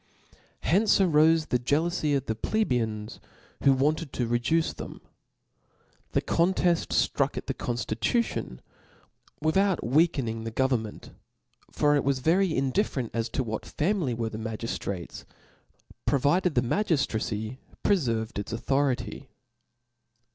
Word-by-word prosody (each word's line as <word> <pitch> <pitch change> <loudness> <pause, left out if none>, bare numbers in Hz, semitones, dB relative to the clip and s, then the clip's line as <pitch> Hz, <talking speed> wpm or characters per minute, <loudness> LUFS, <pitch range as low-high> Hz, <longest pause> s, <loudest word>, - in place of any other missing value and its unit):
Hence 200 +5 +3
arofe 160 -3 +4
the 125 - +2
jealoufy 150 +3 +1
of 135 - -5
the 110 - -1
Plebeians, 110 - -1 0.4
who 140 - +6
wanted 145 +3 +1
to 125 - -1
reduce 120 +8 +1
them. - - -8 1.1
The - - +1
conteft 175 0 +2
ftruck - - +1
at - - -4
the - - -2
conftitution 120 - -2 0.8
with 155 +2 +1
out 195 - +2
weakening 130 -5 +1
the 115 - -3
government; 115 -3 -1 0.6
for 145 0 +2
it 145 - +2
was 140 0 +1
very 175 +8 +2
indifferentof 130 - -1
what 110 -3 -4
family 160 - -1
were 115 -1 -2
the 110 - -7
magiftrates, 110 -4 -5 0.8
pro 145 - +4
vided 170 +5 +2
the 125 - +4
magiftracy 120 - -1 0.2
prcferved 115 - +1
its 100 - -5
authority. 135 +3 -1
135 Hz, 120 wpm, -27 LUFS, 115-165 Hz, 1.1 s, who